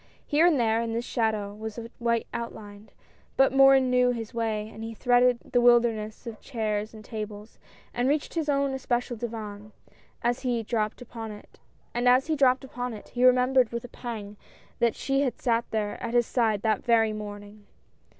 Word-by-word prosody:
Here 310 +4 +4
and 310 -6 +3
there, 225 -1 +2
in 230 -1 -3
the 230 - -1
shadow 220 -4 -1
was 220 +1 -7
a 230 0 -7
white 235 -1 0
outline, 210 -3 -7 0.5
but 270 -1 +4
Morin 270 -1 +6
knew 250 0 +4
his 230 -1 -4
way 220 -2 -2
and 220 0 -10
he 225 0 -6
threaded 245 +1 +3 0.2
the 245 - +4
wilderness 235 -3 +2
of 230 -2 -8
chairs 215 -2 -3
and 215 -1 -12
tables, 215 -1 -7 0.3
and 245 +2 +1
reached 290 0 -1
his 320 -3 -2
own 280 -1 +1
especial 245 -2 -2
divan; 215 -3 -6 0.3
and - - -27 0.3
as 240 +1 +1
he 245 -3 -1
dropped 215 +1 -2
upon 225 -2 -7
it, 250 +1 -1
he 245 - -1
remembered 255 -1 +4
with 235 0 -4
a - - -10
pang 215 -5 -7 0.4
that 235 -1 +2
she 275 0 0
had 265 -4 -1
sat 235 -2 +1
there 210 -2 -2
at 235 +1 -3
his 240 -1 +4
side 220 -5 0
that 215 -3 +1
very 225 -3 +3
morning. 205 0 -9
235 Hz, 170 wpm, -27 LUFS, 215-250 Hz, 0.5 s, Morin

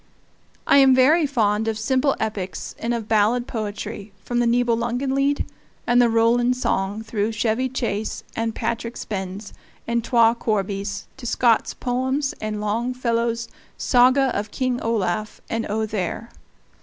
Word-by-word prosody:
I - - +5
am 270 -2 +7
very 295 +5 +5
fond 220 -5 +1
of 220 -1 -1
simple 260 +5 +1
epics 205 -4 -4
and 230 - -2
of 230 -3 -2
ballad 225 +3 +2
poetry, 210 -1 -5
from 240 0 -1
the 240 - +2
Nibelungenlied 245 +4 +1 0.4
and 245 0 +4
the 240 - +4
Roland 240 +2 +3
song 205 -3 -1
through 215 -1 -1
"Chevy 225 +4 0
Chase" 220 -4 -3
and 225 0 -2
"Patrick 235 +1 -3
Spens" 195 0 -5 0.3
and 235 0 0
"Twa 230 -1 +4
Corbies" 200 -2 -2
to 250 -2 -7
Scott's 235 -1 +2
poems 260 +3 -1
and 215 -1 -3
Longfellow's 230 +1 -1 0.3
"Saga 255 +1 +4
of 205 +1 -2
King 255 +1 -1
Olaf" 215 -2 -1
and 230 0 -1
"Othere." 215 0 -2
230 Hz, 135 wpm, -23 LUFS, 215-250 Hz, 0.4 s, am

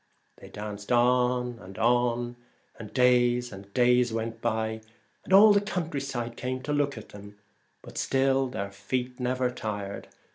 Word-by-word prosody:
They - - -13
danced 105 0 -7
on 125 0 +2
and 95 +1 -11
on, 120 0 +1 0.4
and 110 -2 -9
days 125 -1 +3
and 100 0 -11
days 125 +1 +3
went 115 0 -4
by, 110 -1 -1 0.4
and - - -10
all 205 +2 +8
the 200 - +3
country 170 -8 -3
side 120 -4 -4
came 130 +1 -4
to 145 - -2
look 145 -3 0
at 110 - -10
them, 100 0 -12 0.5
but - - -7
still 135 0 +2
their 100 -6 -5
feet 125 +5 -4
never 125 0 0
tired. 100 -4 -5
125 Hz, 155 wpm, -27 LUFS, 110-130 Hz, 0.5 s, all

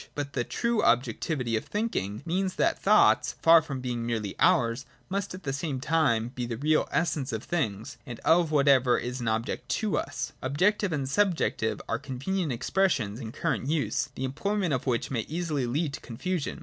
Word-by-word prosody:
But 145 -1 -4
the 120 - 0
true 235 - 0
objectivity 125 -1 +1
of 110 - -2
thinking 135 - -2
means 185 +2 -1
that - - +2
the - - -26
thoughts, - - +4
far 165 0 +8
from 140 -4 -5
being 120 -2 -3
merely 110 -4 -2
ours, 130 -8 +3 0.2
must 195 0 -2
at 190 - -11
the 135 -4 -2
same 140 -1 -3
time 135 -6 +1
be 125 -1 -5
the 115 -1 -4
real 155 +4 +2
essence 150 -5 0
of 110 - -3
the - - -16
things, 110 - -2
and 120 -4 -7
of 170 0 +4
whatever 140 -4 +4
is 125 +1 -4
an 120 - -3
object 110 +3 -2
to 215 -3 0
us. - - -4
Objective 185 +9 +1
and 140 -4 -1
subjective 165 - +1
are 115 - -1
convenient 150 +7 -2
expressions 125 - 0
in 115 -4 -6
current 130 - -2
use, 140 -3 0
the 130 - -4
employment 180 +6 -1
of 130 +1 -2
which 120 0 0
may 120 -4 0
easily 155 -5 -1
lead 145 +4 -1
to - - -5
confusion. 165 +7 -3
140 Hz, 190 wpm, -28 LUFS, 120-170 Hz, 0.2 s, far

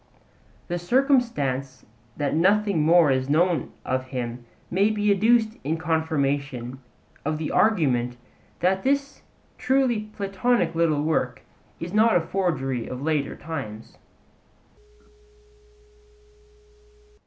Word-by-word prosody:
The 175 0 -2
circumstance 175 - 0 0.3
that 145 -2 -1
nothing 195 +1 +2
more 165 -1 +5
is 130 0 0
known 165 0 +1
of 130 0 -1
him 125 -2 -5 0.3
may 195 +4 +3
be 210 -1 +1
adduced 220 +2 +3
in 155 +4 -1
confirmation 140 -6 -1 0.4
of 155 +1 -1
the 155 0 -3
argument 130 - +2 0.4
that 190 +2 +2
this 280 +2 -1 0.4
truly 250 -5 +1
Platonic 200 -2 0
little 160 -3 +1
work 140 -5 -1 0.4
is 175 +2 -6
not 220 0 +4
a - - +5
forgery 155 -9 -2
of 125 +2 -6
later 150 -3 -1
times. 110 -9 -7
165 Hz, 105 wpm, -24 LUFS, 135-205 Hz, 0.4 s, more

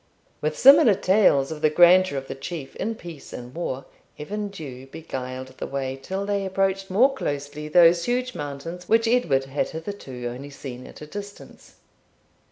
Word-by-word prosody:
With 155 0 -1
similar 275 -5 +8
tales 185 -8 +3
of 155 -1 -6
the 155 - +4
grandeur 175 0 +5
of 135 0 -5
the - - -4
Chief 140 +1 -7
in 225 +2 -2
peace 170 -7 -11
and 125 +1 -8
war, 135 -5 -4 0.3
Evan 205 +7 -4
Dhu 135 -9 -9
beguiled 130 -3 -6
the - - -4
way 135 -1 -3
till 190 +9 -4
they 200 -1 -1
approached 195 0 -1
more 245 +9 +4
closely 145 - -4
those 170 +1 +5
huge 250 +1 -1
mountains 150 +5 -7
which 225 +1 +4
Edward 170 - +2
had 135 +2 -2
hitherto 160 -7 -7
only 125 +4 -6
seen 130 -3 -9
at - - -13
a - - -7
distance. 200 +5 -10
160 Hz, 170 wpm, -24 LUFS, 135-195 Hz, 0.3 s, similar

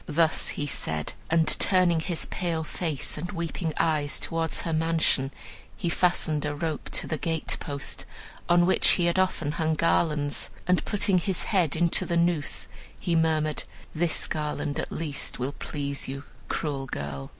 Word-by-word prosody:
Thus 160 0 +2
he 145 - -2
said, 80 - -2 0.2
and, 165 0 +4
turning 180 -3 +4
his 170 0 0
pale 170 -3 -2
face 155 -2 -2
and 175 +3 -4
weeping 170 -2 -2
eyes 150 -3 +1
towards 165 -1 0
her 165 - -2
mansion, 160 -4 +2 0.5
he 175 - -1
fastened 170 -4 +1
a 150 -1 -2
rope 155 0 -3
to - - +3
the 155 - -2
gatepost, 150 -3 -3 0.4
on 175 0 +6
which 190 - +4
he 175 - +2
had 170 +2 +2
often 175 -5 +1
hung 160 0 0
garlands, 150 -3 +1 0.2
and 180 0 +2
putting 195 -3 +3
his 185 0 0
head 175 -8 +2
into 170 +1 +2
the 170 - +1
noose, 170 -3 +1 0.3
he 175 -3 0
murmured, 155 -2 +1 0.3
'This 165 +1 +1
garland 150 -1 -2
at - - -3
least 150 -4 -3
will 130 +3 -2
please 140 -2 -3
you, 135 +1 -5 0.2
cruel 140 -3 -2
girl!' 70 - -5
160 Hz, 160 wpm, -27 LUFS, 145-170 Hz, 0.5 s, on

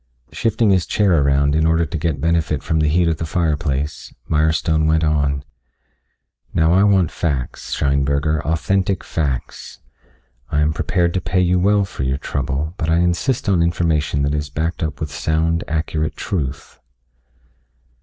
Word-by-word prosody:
Shifting 115 -1 +1
his 95 -3 +2
chair 95 -7 +2
around 70 +1 +2
in 80 +1 +2
order 80 +1 +2
to 80 - -7
get 80 -2 -1
benefit 80 -3 0
from 80 - 0
the 75 - +2
heat 85 +3 +2
of 80 -1 0
the 80 - -3
fireplace, 75 -4 -2 0.2
Mirestone 80 +1 +1
went 80 0 +2
on. 70 -3 +1 1.1
"Now 80 +1 +3
I 95 +2 +5
want 95 -5 +3
facts, 70 -7 -3
Scheinberger, 70 +2 +1
authentic 90 +5 0
facts. 70 -6 -4 0.7
I 75 - +1
am 75 +1 +2
prepared 85 +1 0
to 95 - -1
pay 90 +2 0
you 90 0 +2
well 100 +2 +3
for 95 - -8
your 65 +1 0
trouble, 70 +3 -3
but 80 - -2
I 80 - +3
insist 90 +9 0
on 95 -4 +3
information 80 -4 0
that 70 +1 0
is 75 -1 -2
backed 80 +5 -3
up 80 -1 -3
with 75 -2 -4
sound, 80 +3 0
accurate 80 0 -2
truth." 70 -6 -4
80 Hz, 160 wpm, -20 LUFS, 75-85 Hz, 1.1 s, I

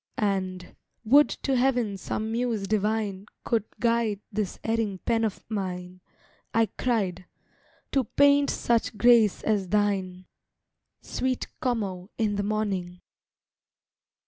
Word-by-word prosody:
And—"Would 200 +7 +1
to 270 - +1
Heaven 245 -5 +1
some 215 +3 -3
Muse 230 -4 -1
divine 210 -1 -1 0.2
Could 225 -3 0
guide 230 -4 +1
this 210 -2 -2
erring 225 -3 0
pen 225 +4 0
of 215 -3 -3
mine," 185 -3 -4 0.5
I 225 -1 +3
cried, 195 -7 -1 0.7
"to 270 -3 +2
paint 285 +4 +4
such 230 -2 0
grace 230 -2 +5
as 200 -4 0
thine, 190 -3 0 0.8
Sweet 255 -1 -2
Como 200 -7 -2
in 215 -3 +1
the 200 - 0
morning!" 195 -4 -2
215 Hz, 110 wpm, -27 LUFS, 195-235 Hz, 0.8 s, grace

